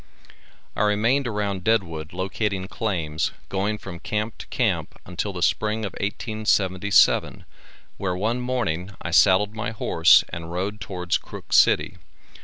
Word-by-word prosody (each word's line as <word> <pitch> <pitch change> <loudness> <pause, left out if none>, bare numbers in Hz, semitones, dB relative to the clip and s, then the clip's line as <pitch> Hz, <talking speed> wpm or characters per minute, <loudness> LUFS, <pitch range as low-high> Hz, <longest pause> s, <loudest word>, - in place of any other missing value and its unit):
I - - -1
remained 115 +6 +2
around 100 -4 -2
Deadwood 85 -9 0
locating 95 +1 -2
claims, 85 -8 -2 0.2
going 100 +2 -1
from 95 -4 -9
camp 105 +3 -3
to - - -9
camp - - -1
until 90 +3 -3
the 90 -2 -4
spring 110 0 0
of 100 - -4
1877, 100 -2 +1 0.5
where 90 -2 -2
one 110 +6 -1
morning, 100 -7 -2
I - - -4
saddled 100 +2 +4
my 110 +3 -3
horse 85 -6 +4
and 85 0 -7
rode 100 +4 -3
towards 90 -2 -2
Crook - - -9
city. - - +4
100 Hz, 135 wpm, -24 LUFS, 90-110 Hz, 0.5 s, saddled